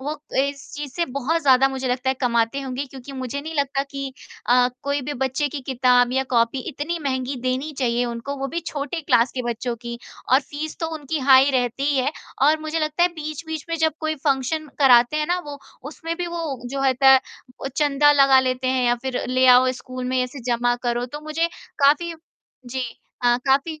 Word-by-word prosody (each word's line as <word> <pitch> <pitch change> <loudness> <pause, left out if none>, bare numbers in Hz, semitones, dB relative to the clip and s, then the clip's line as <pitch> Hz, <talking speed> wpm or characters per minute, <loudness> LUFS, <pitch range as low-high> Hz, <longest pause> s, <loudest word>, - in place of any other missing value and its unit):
वो 280 +3 -4
अ, 300 0 -16
इस 280 -1 -9
चीज़ 290 -2 -6
से 345 - +2 0.2
बहुत 325 +5 0
ज़्यादा, 270 -1 +5
मुझे 265 -1 -3
लगता 250 +1 0
है, - - 0
कमाते 235 +1 +1
होंगे। 270 +1 -4
क्योंकि 265 +1 -11
मुझे 260 +1 -4
नहीं 320 +2 -7
लगता 280 -2 0
कि 275 -1 -5 0.3
अ, 245 0 +4
कोई 280 +1 -1
भी 290 +3 -4
बच्चे 265 +2 0
की 285 +1 -5
किताब 250 -1 +3
या 265 - +2
कॉपी 235 +1 +2
इतनी 315 +4 -3
महँगी 260 -1 -2
देनी 260 +4 -1
चाहिए 245 -1 +1
उनको, 240 +4 -4
वो 275 0 -3
भी 340 +5 -3
छोटे 295 +3 -3
क्लास 245 -5 +2
के 255 - -3
बच्चों 240 0 -3
की। 235 0 -7 0.3
और 265 - +7
फ़ीस 295 +2 -6
तो 325 - 0
उनकी 305 0 -3
हाई 270 +1 +6
रहती 255 +1 0
ही 290 -1 +1
है, 265 +4 +1 0.3
और 305 +3 +5
मुझे 310 +1 -2
लगता 310 +2 0
है, 350 - +5
बीच-बीच 310 0 -6
में 330 - -1
जब 320 0 +2
कोई 315 0 -1
फंक्शन 290 +3 0
कराते 250 0 +5
हैं 305 0 0
ना 355 +2 +1
वो, 285 -1 -7 0.3
उसमें 330 +2 -5
भी 355 0 -3
वो, 330 -7 -4
जो 270 +3 -4
होता 265 0 +4
है, 265 - +6 0.4
ओ, 270 - -1
चंदा 290 -1 +4
लगा 275 -2 +6
लेते 255 0 -1
हैं, 255 -1 +1
या 240 - +4
फिर 260 -1 -2
ले 255 +1 +3
आओ 255 0 +4
स्कूल 255 0 -6
में, 255 0 0
ऐसे 250 +2 -6
जमा 240 +1 +1
करो। 240 +1 0
तो 295 +4 -8
मुझे 325 +2 0 0.3
काफ़ी 305 +4 +3 0.5
जी 260 +2 -3 0.4
अ, 240 0 +4
काफ़ी 285 +4 +1
270 Hz, 210 wpm, -22 LUFS, 255-295 Hz, 0.5 s, और